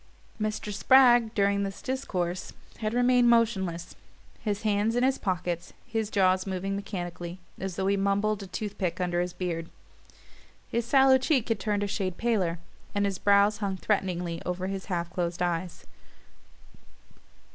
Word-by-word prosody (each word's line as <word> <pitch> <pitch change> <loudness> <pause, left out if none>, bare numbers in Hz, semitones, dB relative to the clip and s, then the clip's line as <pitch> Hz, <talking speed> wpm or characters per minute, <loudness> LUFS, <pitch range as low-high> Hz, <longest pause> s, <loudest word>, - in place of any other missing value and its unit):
Mr. 215 -1 -2
Spragg, 240 0 +5
during 200 0 +2
this 195 -1 -4
discourse, 185 -9 -3 0.3
had 215 -1 -1
remained 245 0 +4
motionless, 190 -8 +1 0.4
his 210 -1 -3
hands 210 +1 +1
in 245 - +2
his 265 +1 +2
pockets, 175 -2 -2
his 225 -3 -2
jaws 185 -2 +2
moving 195 +1 -2
mechanically, 175 -3 -5 0.2
as 190 -2 -4
though 190 - -1
he 200 +1 +3
mumbled 200 +2 +1
a 195 - -7
tooth 205 +2 -5
pick 185 -1 -1
under 175 -1 0
his 180 0 -2
beard. 170 -2 -4 1.0
His 235 -1 0
sallow 265 0 +6
cheek 260 -3 +1
had 225 -3 +1
turned 205 +1 0
a - - -1
shade 190 -3 -2
paler, 200 -8 0 0.4
and 205 0 +2
his 195 -2 -2
brows 200 +1 +4
hung 200 -3 -2
threateningly 180 -4 -1
over 180 +1 -3
his 195 0 -4
half 175 -3 -2
closed 175 -1 -2
eyes. 175 0 -3
200 Hz, 155 wpm, -28 LUFS, 180-220 Hz, 1.0 s, sallow